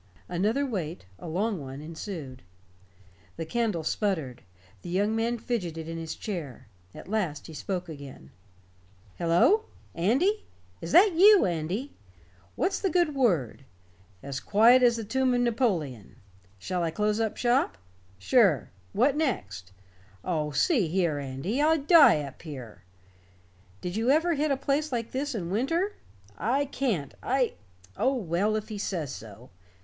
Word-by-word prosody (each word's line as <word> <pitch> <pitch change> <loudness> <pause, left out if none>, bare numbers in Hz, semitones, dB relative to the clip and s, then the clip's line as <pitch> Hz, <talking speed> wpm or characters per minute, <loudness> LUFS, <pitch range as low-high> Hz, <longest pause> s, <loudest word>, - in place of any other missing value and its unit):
Another 210 +11 0
wait 175 - -4
a - - -8
long 190 +2 -1
one 135 0 -8
ensued. 155 -4 -7 1.0
The 165 - -4
candle 215 -3 -1
sputtered. 160 - -2 0.4
The 175 - -8
young 205 +5 +1
man 230 +2 0
fidgeted 175 -10 -3
in 165 0 -5
his 160 -1 -5
chair. 155 - -6 0.3
At - - -10
last 190 -8 -2
he 160 - -10
spoke 180 +4 -4
again: 140 - -10 0.9
"Hello! 175 - +4 0.3
Andy? 275 - +1 0.4
Is 165 - -5
that 390 +1 +6
you, 395 +4 +7
Andy? 180 - -3 0.6
What's 380 - 0
the 390 - 0
good 345 -3 +2
word? 175 - +1 0.6
As 135 -1 -4
quiet 230 +5 +5
as 240 -1 +5
the 230 - -4
tomb 255 +3 +1
of 245 - +2
Napoleon. 190 - -1 0.4
Shall 180 - -3
I 165 - 0
close 210 +5 0
up 220 -2 -1
shop? 245 - +1 0.4
Sure. 170 - +3 0.2
What 260 +7 +3
next? 105 - -2 0.5
Oh, 155 -4 -1
see 195 - +2
here, 165 -3 0
Andy, 140 - -3
I'd 310 -1 +2
die 290 - +7
up 140 -2 -10
here. 130 - -9 1.0
Did 180 +1 -4
you 225 +3 0
ever 325 +5 +3
hit 300 0 0
a 275 - +1
place 285 +3 -1
like 235 -2 -3
this 275 +1 -2
in 175 -5 -4
winter? 330 - 0 0.5
I 260 +8 +1
can't 235 - -2
I 255 -1 +1 0.4
oh, 270 +1 +1
well, 200 0 0
if 215 +1 -4
he 210 -2 -5
says 170 -8 -3
so. 110 +3 -11
205 Hz, 145 wpm, -27 LUFS, 160-260 Hz, 1.0 s, you